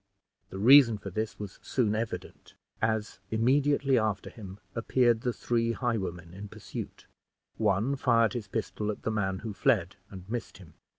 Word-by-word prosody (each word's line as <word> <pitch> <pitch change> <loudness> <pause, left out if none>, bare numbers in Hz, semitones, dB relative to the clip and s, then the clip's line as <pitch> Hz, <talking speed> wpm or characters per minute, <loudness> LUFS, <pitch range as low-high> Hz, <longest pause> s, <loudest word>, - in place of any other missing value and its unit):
The 95 - -7
reason 120 +1 +7
for 100 -1 -8
this 110 +4 -3
was 100 -3 -8
soon 115 -5 0
evident, 110 +1 -5 0.3
as 110 -2 -1
immediately 135 +3 +3
after 110 -2 -2
him 100 -3 -10
appeared 120 0 +2
the 125 -1 0
three 115 -1 0
highwaymen 95 -9 -3
in 100 +2 -8
pursuit. - - -8 0.5
One 110 +5 +2
fired 115 -5 +3
his 115 -4 -4
pistol 105 0 -3
at 105 - -4
the 110 - -1
man 95 -3 -1
who 110 - -3
fled, - - +1
and 95 -1 -10
missed 115 +2 -5
him. 85 -6 -15
110 Hz, 160 wpm, -29 LUFS, 100-120 Hz, 0.5 s, reason